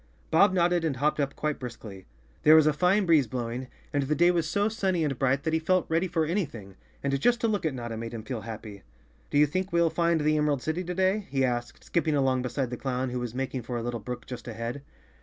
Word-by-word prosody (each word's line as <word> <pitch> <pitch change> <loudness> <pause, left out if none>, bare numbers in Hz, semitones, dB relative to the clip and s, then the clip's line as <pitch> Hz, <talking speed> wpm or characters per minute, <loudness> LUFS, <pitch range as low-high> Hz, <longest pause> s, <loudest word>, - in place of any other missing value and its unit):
^^jBob 200 +5 +6
nodded 175 -1 +2
and 155 -4 0
hopped 150 +3 +1
up 140 -1 -1
quite 150 -1 -2
briskly. 110 -6 -9 0.3
There 155 - +7
was 160 -1 +7
a 155 - +4
fine 185 +6 +3
breeze 155 -7 +4
blowing, 120 +2 -4 0.3
and 145 - +2
the 145 +3 0
day 175 +2 +5
was 165 -3 0
so 205 +3 +1
sunny 195 -6 0
and 140 -4 -2
bright 135 +1 +1
that 160 0 -1
he 160 - +3
felt 185 +3 +2
ready 165 +3 +1
for 165 -2 0
anything, 140 - -3 0.3
and 140 -1 0
just 240 +4 +3
to 230 - +2
look 205 -6 0
at 145 - -3
Notta 120 -2 -5
made 115 +1 -5
him 110 - -6
feel 120 -1 -4
happy. 110 -2 -8 0.5
"Do - - 0
you 150 - +7
think 185 +6 -2
we'll 170 -1 +3
find 170 -1 +2
the 155 +1 +2
Emerald 150 -3 +1
City 160 +4 -1
to 180 +1 -4
day?" 190 +2 +1
he 135 -1 +1
asked, 120 -1 -3
skipping 160 -3 0
along 130 -2 +2
beside 125 0 -2
the 125 - -4
clown, 130 -1 -2
who 125 - -2
was 120 -1 -5
making 130 0 -2
for 120 +1 -4
a 115 - -3
little 120 0 -3
brook 125 +3 -6
just 125 -1 -8
ahead. 115 +4 -5
145 Hz, 250 wpm, -27 LUFS, 125-170 Hz, 0.5 s, There